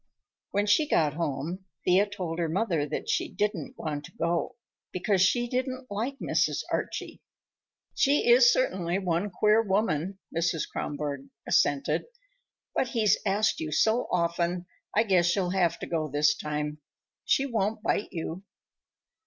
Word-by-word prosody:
When 205 Hz, +1 st, 0 dB
she 290 Hz, +9 st, +3 dB
got 150 Hz, -, +2 dB
home 165 Hz, +4 st, -3 dB, 0.2 s
Thea 190 Hz, +3 st, +4 dB
told 180 Hz, -5 st, -4 dB
her 165 Hz, -2 st, 0 dB
mother 170 Hz, -5 st, 0 dB
that 155 Hz, -, -4 dB
she -, -, 0 dB
didn't 205 Hz, -8 st, -2 dB
want 150 Hz, -2 st, -4 dB
to -, -, -13 dB
go, 170 Hz, +1 st, -1 dB, 0.4 s
because 185 Hz, +1 st, +1 dB
she 240 Hz, +6 st, +3 dB
didn't 255 Hz, 0 st, -3 dB
like 235 Hz, +7 st, -2 dB
Mrs. -, -, 0 dB
Archie. -, -, -3 dB, 0.7 s
"She 280 Hz, -1 st, +2 dB
is 245 Hz, 0 st, +7 dB
certainly 185 Hz, -9 st, 0 dB
one 180 Hz, +1 st, -1 dB
queer 210 Hz, +4 st, +3 dB
woman," 195 Hz, -4 st, 0 dB, 0.2 s
Mrs. 165 Hz, -1 st, 0 dB
Kronborg 145 Hz, -2 st, -4 dB, 0.2 s
assented, 145 Hz, -1 st, +2 dB, 0.7 s
"but 260 Hz, -, +1 dB
he's 220 Hz, -5 st, +2 dB
asked 205 Hz, +2 st, +2 dB
you 155 Hz, -1 st, -4 dB
so 220 Hz, +10 st, +2 dB
often, 170 Hz, 0 st, 0 dB, 0.3 s
I 220 Hz, -, +6 dB
guess 175 Hz, -5 st, +3 dB
you'll 185 Hz, -3 st, 0 dB
have 175 Hz, -3 st, +2 dB
to -, -, -6 dB
go 160 Hz, -2 st, -1 dB
this 145 Hz, +1 st, +2 dB
time. 150 Hz, 0 st, -3 dB, 0.4 s
She 270 Hz, -, +2 dB
won't 220 Hz, -3 st, -1 dB
bite 215 Hz, -, 0 dB
you." 170 Hz, +1 st, -5 dB
185 Hz, 145 wpm, -28 LUFS, 165-215 Hz, 0.7 s, is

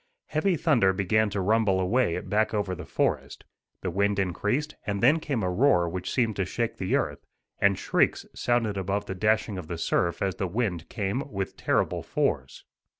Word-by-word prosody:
Heavy 170 Hz, +3 st, +1 dB
thunder 120 Hz, -, +3 dB
began 105 Hz, +3 st, +2 dB
to 100 Hz, -, -3 dB
rumble 100 Hz, -1 st, +2 dB
away 95 Hz, 0 st, +1 dB
back 105 Hz, +3 st, 0 dB
over 100 Hz, -3 st, -1 dB
the 90 Hz, 0 st, -7 dB
forest. -, -, -1 dB, 0.4 s
The 90 Hz, -, -2 dB
wind 100 Hz, +2 st, +1 dB
increased, 105 Hz, -, -1 dB
and 100 Hz, -1 st, -1 dB
then 145 Hz, +9 st, +5 dB
came 140 Hz, -9 st, -2 dB
a 90 Hz, -, 0 dB
roar 90 Hz, -4 st, +3 dB
which 90 Hz, +2 st, -4 dB
seemed 115 Hz, -5 st, +1 dB
to 100 Hz, -, +1 dB
shake 115 Hz, +5 st, -2 dB
the 95 Hz, -, 0 dB
earth, -, -, -1 dB, 0.4 s
and -, -, +3 dB
shrieks -, -, +1 dB
sounded 115 Hz, -4 st, 0 dB
above 100 Hz, +2 st, -1 dB
the 95 Hz, -, -4 dB
dashing 105 Hz, 0 st, +1 dB
of 85 Hz, -, -8 dB
the 85 Hz, -, -4 dB
surf 85 Hz, +1 st, 0 dB
as 95 Hz, -2 st, -1 dB
the 95 Hz, -, -1 dB
wind 90 Hz, -5 st, -2 dB
came 120 Hz, +7 st, -3 dB
with 95 Hz, -1 st, -3 dB
terrible -, -, 0 dB
force. 65 Hz, +1 st, -2 dB
100 Hz, 185 wpm, -27 LUFS, 95-115 Hz, 0.4 s, then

